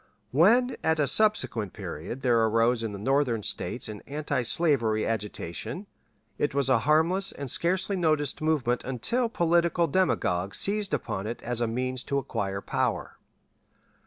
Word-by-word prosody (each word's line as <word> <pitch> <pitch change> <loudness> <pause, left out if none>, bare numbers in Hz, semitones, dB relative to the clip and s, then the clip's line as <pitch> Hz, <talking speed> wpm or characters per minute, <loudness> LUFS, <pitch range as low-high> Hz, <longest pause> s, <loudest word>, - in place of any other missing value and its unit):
When 230 - +4
at 160 0 +1
a 150 - +3
subsequent 135 - +1
period 95 - -7
there 120 -3 +3
arose 115 +2 +2
in 115 -2 -3
the 100 - -6
Northern 125 0 +1
States - - -2
an 105 -2 -7
antislavery 140 -5 +1
agitation, 110 - -4 0.5
it 145 -2 0
was 140 -2 +1
a 130 -3 +4
harmless 175 +6 +3
and 140 -3 -5
scarcely 185 +3 +1
noticed 155 -6 0
movement 145 -6 0
until 225 - 0
political 170 -3 +2
demagogues 100 - 0
seized 200 -4 +1
upon 105 -6 -4
it 115 - -6
as 120 0 -3
a 120 - +1
means 130 +2 -2
to 140 - -1
acquire 100 -7 -3
power. - - -2
135 Hz, 145 wpm, -27 LUFS, 115-170 Hz, 0.5 s, When